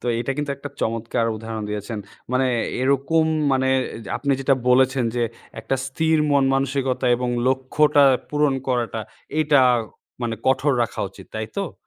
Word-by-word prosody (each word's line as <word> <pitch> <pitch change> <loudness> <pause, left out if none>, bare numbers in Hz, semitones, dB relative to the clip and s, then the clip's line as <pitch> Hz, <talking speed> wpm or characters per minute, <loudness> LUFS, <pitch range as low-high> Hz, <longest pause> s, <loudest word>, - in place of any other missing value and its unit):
তো - - -7
এটা 120 - -3
কিন্তু 145 -1 -2
একটা 145 +1 -7
চমৎকার 115 0 -1
উদাহরণ 110 0 -6
দিয়েছেন। 105 +1 -4 0.3
মানে 130 +1 +2 0.3
এরকম 140 +5 +2 0.3
মানে, 130 0 +2 0.2
অ্যা 110 -4 -7
আপনি 140 -1 0
যেটা 135 0 +3
বলেছেন, 130 0 +4
যে 120 - +1 0.4
একটা 115 +4 -1
স্থির 160 +4 +1
মন-মানসিকতা 135 -2 +1
এবং 125 0 -2 0.2
লক্ষ্যটা 135 +3 +3 0.3
পূরণ 145 -2 +1
করাটা 120 -3 -1 0.4
এইটা 150 -3 +4 0.6
মানে 115 -1 -1
কঠোর 135 +2 +3
রাখা 115 - -4
উচিত, 95 - -14
তাইতো? 110 - -4
130 Hz, 140 wpm, -22 LUFS, 115-140 Hz, 0.6 s, বলেছেন